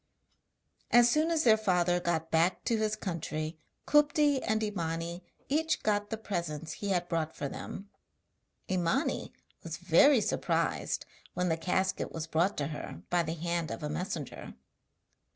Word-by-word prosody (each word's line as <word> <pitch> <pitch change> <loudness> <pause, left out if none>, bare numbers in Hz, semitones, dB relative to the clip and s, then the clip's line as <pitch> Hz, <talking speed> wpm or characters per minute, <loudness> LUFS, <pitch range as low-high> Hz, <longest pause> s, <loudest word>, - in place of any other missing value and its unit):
As 240 0 +6
soon 310 +4 +2
as 325 -2 +2
their 220 -3 +6
father 180 -4 +2
got 165 -2 -1
back 165 +3 +2
to 230 - +1
his 215 -1 0
country 160 -5 -4 0.3
Kupti 295 -2 +4
and 220 0 0
Imani 170 -3 -3 0.2
each 320 +3 0
got 205 -1 +1
the 225 - -3
presents 170 -7 -4
he 205 - -4
had 175 -2 +1
brought 160 -2 -2
for 140 - -3
them. 195 +7 -7 0.8
Imani 185 - 0 0.3
was - - -6
very 285 -3 +5
surprised - - -1 0.3
when 180 0 0
the 160 - +2
casket 185 +3 -1
was 165 -1 -4
brought 170 +5 +1
to 145 0 -1
her 150 - -7
by 175 -1 +4
the 165 0 -3
hand 170 0 -2
of 165 - -5
a 150 - -2
messenger. 165 - -5
180 Hz, 150 wpm, -31 LUFS, 165-220 Hz, 0.8 s, As